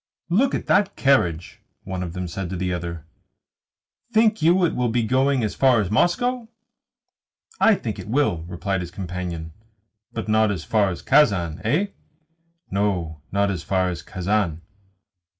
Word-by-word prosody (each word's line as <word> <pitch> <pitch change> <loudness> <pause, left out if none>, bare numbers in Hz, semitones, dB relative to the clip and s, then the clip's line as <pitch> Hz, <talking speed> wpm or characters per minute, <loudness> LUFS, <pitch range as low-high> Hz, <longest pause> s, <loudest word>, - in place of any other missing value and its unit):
"Look 245 +10 +3
at - - -4
that 200 0 +2
carriage," 90 - +1 0.2
one 95 -1 -4
of 85 -2 -5
them 90 0 -4
said 90 +1 -5
to 95 - -4
the 90 0 -2
other. 85 -2 -5 1.1
"Think 220 0 +3
you 175 +3 +4
it 165 - 0
will 125 -1 0
be 120 +1 +1
going 130 +2 +2
as 105 - -1
far 130 -4 +4
as 100 -2 -1
Moscow?" 235 - +1 1.1
"I 225 - +5
think 110 - -5
it - - -8
will," 125 - +1
replied 95 +2 -2
his 85 - -6
companion. 90 -3 -5 0.6
"But 110 - -5
not 110 0 +3
as 95 -5 -3
far 105 -3 +2
as 90 - -6
Kazan, 90 - +3
eh?" 160 - +1 0.8
"No, 90 -6 -1
not 100 0 +1
as 90 -3 -3
far 95 0 0
as 85 -4 -5
Kazan." 90 -2 -1
100 Hz, 160 wpm, -23 LUFS, 90-135 Hz, 1.1 s, I